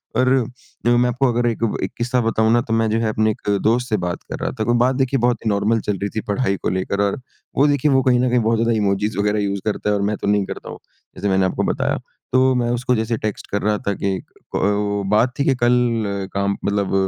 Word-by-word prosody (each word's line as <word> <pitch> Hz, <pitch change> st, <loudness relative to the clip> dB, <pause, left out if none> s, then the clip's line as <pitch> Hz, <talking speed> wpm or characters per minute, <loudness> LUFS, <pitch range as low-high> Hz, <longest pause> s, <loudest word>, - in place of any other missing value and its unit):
और 130 Hz, 0 st, +3 dB, 0.6 s
देखो 120 Hz, 0 st, +4 dB
मैं 125 Hz, 0 st, +3 dB
आपको 130 Hz, +3 st, +1 dB
अगर 120 Hz, +1 st, +1 dB
एक 115 Hz, -, -4 dB, 0.2 s
एक -, -, -2 dB
किस्सा 125 Hz, +1 st, 0 dB
बताऊँ 110 Hz, -1 st, +2 dB
ना 120 Hz, -, +4 dB
तो 115 Hz, -, -4 dB
मैं 115 Hz, 0 st, +2 dB
जो 110 Hz, +1 st, +1 dB
है 115 Hz, -, 0 dB
अपने 110 Hz, 0 st, +1 dB
एक 105 Hz, -, -6 dB
दोस्त 120 Hz, +3 st, +1 dB
से 110 Hz, -, +1 dB
बात 90 Hz, -, -4 dB
कर -, -, -5 dB
रहा -, -, -2 dB
था -, -, +1 dB
कोई 120 Hz, +2 st, +1 dB
बात 125 Hz, +2 st, +2 dB
देखिए 135 Hz, 0 st, +1 dB
बहुत 120 Hz, 0 st, +2 dB
ही 110 Hz, -, +2 dB
नॉर्मल 105 Hz, +3 st, +1 dB
चल 105 Hz, -, 0 dB
रही 100 Hz, +2 st, -3 dB
थी 110 Hz, -, 0 dB
पढ़ाई 100 Hz, -2 st, 0 dB
को -, -, +1 dB
लेकर 95 Hz, +2 st, -1 dB
और 100 Hz, +4 st, -1 dB, 0.4 s
वो 140 Hz, -, +4 dB
देखिए 145 Hz, 0 st, +2 dB
वो 135 Hz, -1 st, +4 dB
कहीं 125 Hz, -1 st, +3 dB
न 125 Hz, 0 st, +2 dB
कहीं 125 Hz, 0 st, +3 dB
बहुत 115 Hz, 0 st, +1 dB
ज़्यादा 115 Hz, 0 st, +2 dB
इमोजिस 105 Hz, 0 st, 0 dB
वगैरह 105 Hz, +1 st, +1 dB
यूज़ 100 Hz, -1 st, -2 dB
करता 105 Hz, -1 st, -1 dB
है। 105 Hz, -, +2 dB
और 100 Hz, -, -1 dB
मैं 105 Hz, -, -2 dB
तो -, -, -4 dB
नहीं 105 Hz, -1 st, +2 dB
करता -, -, -7 dB
हूँ -, -, -8 dB, 0.4 s
जैसे 100 Hz, +2 st, -2 dB
मैंने 95 Hz, 0 st, +3 dB
आपको 95 Hz, -, -1 dB
बताया। -, -, 0 dB, 0.4 s
तो 130 Hz, 0 st, +4 dB
मैं 120 Hz, -1 st, 0 dB
उसको 125 Hz, +1 st, 0 dB
जैसे 110 Hz, 0 st, -1 dB
टेक्स्ट 110 Hz, -1 st, -4 dB
कर 100 Hz, -, 0 dB
रहा 105 Hz, 0 st, +1 dB
था 100 Hz, -, +2 dB
कि 95 Hz, -1 st, +1 dB, 0.4 s
ओ 100 Hz, 0 st, 0 dB
बात 110 Hz, +5 st, +3 dB
थी 140 Hz, -, +3 dB
कि 135 Hz, -, +3 dB
कल 120 Hz, 0 st, +2 dB, 0.5 s
अ -, -, -10 dB
काम 100 Hz, 0 st, 0 dB
मतलब 100 Hz, -1 st, 0 dB
110 Hz, 265 wpm, -20 LUFS, 100-120 Hz, 0.6 s, देखो